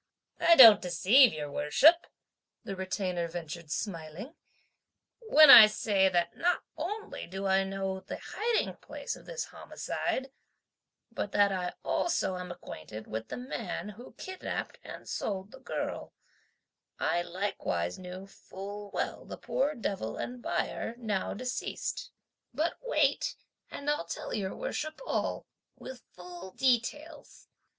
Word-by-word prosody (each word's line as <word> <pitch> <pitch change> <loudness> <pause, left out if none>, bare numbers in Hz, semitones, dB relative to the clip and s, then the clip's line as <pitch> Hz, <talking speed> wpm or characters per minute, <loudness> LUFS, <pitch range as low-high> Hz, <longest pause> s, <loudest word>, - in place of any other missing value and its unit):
"I 335 - +6
don't 225 -8 +10
deceive 190 +9 +5
your 150 -2 -5
Worship," 300 - +4 0.6
the 200 -4 -5
Retainer 185 -2 -2
ventured 170 -1 -7
smiling, 170 - -5 1.0
"when 310 -6 +9
I 220 -2 +12
say 200 -2 +2
that 175 -2 0
not 355 +1 +1
only 415 +7 -5
do 190 +3 -5
I 190 0 +3
know 195 0 -3
the 190 - -7
hiding 455 +1 -1
place - - -6
of - - -16
this - - -4
homicide, 265 0 -4 0.8
but 205 -3 -4
that 200 -1 +4
I 180 -2 -3
also 330 - 0
am 180 0 -6
acquainted 110 - -9
with 110 +1 -5
the - - -6
man 215 -7 -5
who 220 +4 -12
kidnapped 375 0 -5
and - - -10
sold 195 0 -3
the - - -12
girl; - - -5 0.9
I 175 - +1
likewise 175 - -3
knew 185 +1 -8
full 200 +1 -9
well - - -3
the - - -8
poor 290 +3 -1
devil 195 - -3
and 245 0 -5
buyer, 230 - -2
now 210 -7 -2
deceased. 255 - -4 0.5
But 315 +5 +1
wait, - - +1 0.3
and 280 - -8
I'll 295 -11 0
tell - - -5
your 190 -2 -2
worship 310 +1 -4
all, - - -2 0.3
with 260 -2 -10
full 180 +1 -9
details. 270 - -1
200 Hz, 135 wpm, -30 LUFS, 180-265 Hz, 1.0 s, I